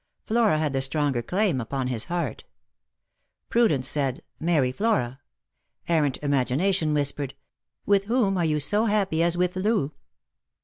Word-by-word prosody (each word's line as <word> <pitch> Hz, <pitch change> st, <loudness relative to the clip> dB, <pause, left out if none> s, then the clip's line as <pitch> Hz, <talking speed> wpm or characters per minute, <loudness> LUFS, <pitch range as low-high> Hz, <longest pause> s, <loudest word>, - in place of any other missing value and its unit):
Flora 220 Hz, -7 st, +2 dB
had 155 Hz, -2 st, -1 dB
the 135 Hz, -, 0 dB
stronger 135 Hz, -2 st, +1 dB
claim 180 Hz, -, 0 dB
upon 130 Hz, +3 st, -3 dB
his 120 Hz, -3 st, -2 dB
heart. 170 Hz, -9 st, -3 dB, 1.1 s
Pru 235 Hz, 0 st, +4 dB
dence 135 Hz, -3 st, 0 dB
said, 135 Hz, -3 st, -1 dB
" -, -, -45 dB
Marry 155 Hz, -6 st, +1 dB
Flora." 135 Hz, -, -1 dB, 0.7 s
Errant 150 Hz, -5 st, +1 dB
imagination 150 Hz, +5 st, +1 dB
whispered, 140 Hz, -1 st, -2 dB, 0.3 s
" -, -, -57 dB
With 200 Hz, -1 st, +2 dB
whom 220 Hz, -3 st, +1 dB
are 175 Hz, -, 0 dB
you 150 Hz, -1 st, +1 dB
so 205 Hz, +9 st, +3 dB
happy 200 Hz, -7 st, +1 dB
as 170 Hz, +1 st, +1 dB
with 180 Hz, +1 st, 0 dB
Loo 185 Hz, -6 st, 0 dB
155 Hz, 150 wpm, -25 LUFS, 135-195 Hz, 1.1 s, Pru